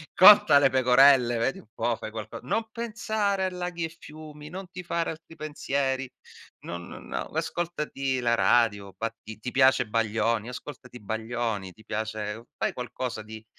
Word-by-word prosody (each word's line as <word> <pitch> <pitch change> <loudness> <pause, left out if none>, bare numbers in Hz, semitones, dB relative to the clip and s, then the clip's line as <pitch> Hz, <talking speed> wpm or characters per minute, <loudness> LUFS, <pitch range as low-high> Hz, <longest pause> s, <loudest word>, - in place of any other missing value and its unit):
Conta 185 -7 +9
le - - +5
pecorelle, 130 -1 +5
vedi 115 +4 0
un - - -17
po', 115 0 0
fai 110 - -6
qualco 110 +1 -7
non 220 - -1
pensare 215 -4 -1
a - - 0
laghi 180 -1 -4
e 160 +1 -8
fiumi, 150 -1 -11
non 185 +1 -8
ti 180 +1 -7
fare 170 -1 -1
altri 160 0 -12
pensieri. 135 -4 -2 0.5
Non 85 0 -7
no, - - -6
ascoltati 150 -5 -2
la 120 -1 +2
radio. 100 -6 +2
Ba 115 +1 -2
ti 110 0 -9
ti 125 +3 -5
piace 130 -2 +4
Baglioni, 110 0 0
ascoltati 125 -1 -9
Baglioni, 110 -3 -3
ti 110 - -19
piace 110 0 -4
fai - - -1
qualcosa 125 -2 -4
di 110 0 -10
125 Hz, 160 wpm, -27 LUFS, 110-160 Hz, 0.5 s, Conta